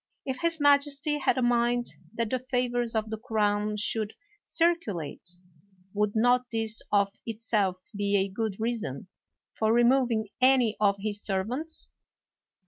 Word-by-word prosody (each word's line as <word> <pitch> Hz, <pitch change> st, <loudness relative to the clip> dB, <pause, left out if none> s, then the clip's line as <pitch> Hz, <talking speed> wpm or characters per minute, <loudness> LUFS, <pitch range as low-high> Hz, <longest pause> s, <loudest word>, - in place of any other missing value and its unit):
If 260 Hz, -1 st, -3 dB
his 335 Hz, -1 st, +1 dB
majesty 290 Hz, +1 st, +3 dB
had 275 Hz, -, +1 dB
a 255 Hz, -, +1 dB
mind 240 Hz, 0 st, +2 dB, 0.3 s
that 230 Hz, -2 st, -2 dB
the 255 Hz, -, 0 dB
favors 245 Hz, -2 st, -1 dB
of 220 Hz, 0 st, -1 dB
the 220 Hz, -, -4 dB
crown 210 Hz, -2 st, 0 dB
should 210 Hz, 0 st, -1 dB, 0.3 s
circulate, 205 Hz, -, -1 dB, 0.6 s
would 210 Hz, 0 st, 0 dB
not 245 Hz, +2 st, +3 dB
this 225 Hz, -1 st, +1 dB
of 200 Hz, -1 st, +2 dB
itself 215 Hz, -4 st, 0 dB, 0.2 s
be 200 Hz, 0 st, +1 dB
a 195 Hz, 0 st, +1 dB
good 205 Hz, +1 st, -3 dB
rea 230 Hz, +2 st, 0 dB
son 180 Hz, -, -5 dB, 0.4 s
for 220 Hz, 0 st, +1 dB
removing 240 Hz, -2 st, +3 dB
any 255 Hz, -4 st, +4 dB
of 200 Hz, -2 st, +3 dB
his 205 Hz, 0 st, -3 dB
servants? 240 Hz, +12 st, -2 dB
225 Hz, 140 wpm, -28 LUFS, 205-250 Hz, 0.6 s, any